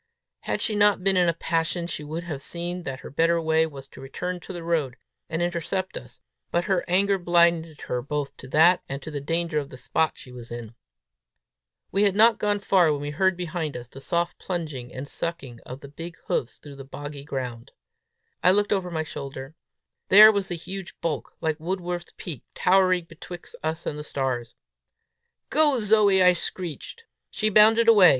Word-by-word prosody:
Had - - -2
she 215 - 0
not 205 -2 +4
been 195 0 +3
in 180 -2 +4
a - - +1
passion, 165 +1 -1
she 160 -3 -5
would 160 +3 -5
have 155 -5 -5
seen 175 +4 -4
that 130 -1 -5
her - - -9
better 165 +4 +2
way 160 0 +2
was 135 -3 -10
to - - -13
return 180 +7 -4
to 175 - -10
the 175 -2 -6
road, 155 -7 -1 0.3
and 165 +1 -1
intercept 175 +2 -2
us; - - -9 0.3
but 175 - +1
her 190 -2 +1
anger 195 +2 +3
blinded 170 -3 +2
her 125 - -2
both 140 +1 -3
to 130 - -11
that 165 +6 +5
and 135 - -3
to 155 - -7
the 145 -2 -4
danger 165 +1 0
of 140 -1 -6
the 130 - -10
spot 160 +5 0
she 125 - -12
was 120 -1 -10
in. 120 -1 -7 1.2
We 195 - +1
had 200 -2 +3
not 225 +1 +5
gone 205 -1 +1
far 180 -5 +4
when 145 - -1
we 145 0 -4
heard 190 +4 +1
behind 165 -4 -3
us 120 -1 -9
the 135 +3 -12
soft 170 +4 -1
plunging 155 -9 -4
and 130 +2 -6
sucking 140 -8 -5
of 130 +2 -8
the 140 - -9
big 165 +4 -9
hoofs 120 - -2
through 145 -2 -12
the 135 - -8
boggy 145 +1 -8
ground. 125 -4 -5 0.7
I 180 - +6
looked 205 +2 +3
over 190 -3 -1
my 160 -2 -2
shoulder. 140 -2 -7 0.6
There 215 +3 +10
was 200 -2 -1
the 175 - -3
huge 185 +2 -8
bulk, 165 -3 -3
like 160 -1 -1
Wordsworth's 175 0 -4
peak, 155 -8 -6
towering 185 -1 +3
betwixt 175 +1 -10
us 160 +1 -3
and 150 - -3
the - - -5
stars! 130 -5 -3 1.0
"Go, 295 -3 +4
Zoe!" 210 -3 +4
I 180 0 +7
shrieked. 180 - -5 0.3
She 215 - 0
bounded 220 +2 +6
away. 205 -6 +8
170 Hz, 195 wpm, -25 LUFS, 145-185 Hz, 1.2 s, There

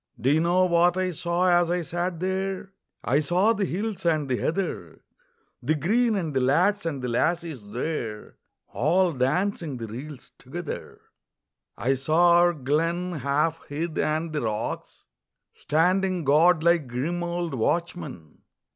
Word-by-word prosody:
Do 130 +4 +2
you 155 - +4
know 180 +2 +3
what 175 0 +3
I 185 -1 0
saw 175 +2 +1
as 175 -1 +3
I 175 0 0
sat 175 +1 -3
there? 190 +1 -2 0.3
I 135 +4 +2
saw 180 +8 +2
the 205 -3 -1
hills 205 +3 -3
and 155 -4 +1
the 125 -2 0
heather, 185 +4 -3 0.6
The 150 +6 +1
green, 220 - +2
and 165 -6 -2
the 130 - +1
lads 175 +9 +2
and 140 -5 -4
the - - -1
lassies 145 -2 -1
there 115 -3 -4 0.3
All 170 - +2
dancing 150 +3 -1
the 115 - -5
reels 130 +5 -9
together. 155 +5 -7 0.8
I 130 +3 +1
saw 155 +6 +3
our 175 0 +4
glen, 165 +5 -1
half 150 +5 0
hid, 160 +3 -3
and 155 +1 -1
the 150 - -1
rocks 110 -1 -4 0.5
Standing 180 +3 +1
guard 160 +4 +4
like 170 -4 +3
grim 145 +9 -2
old 175 -1 -3
watchmen. 140 - -3
165 Hz, 145 wpm, -25 LUFS, 140-180 Hz, 0.8 s, you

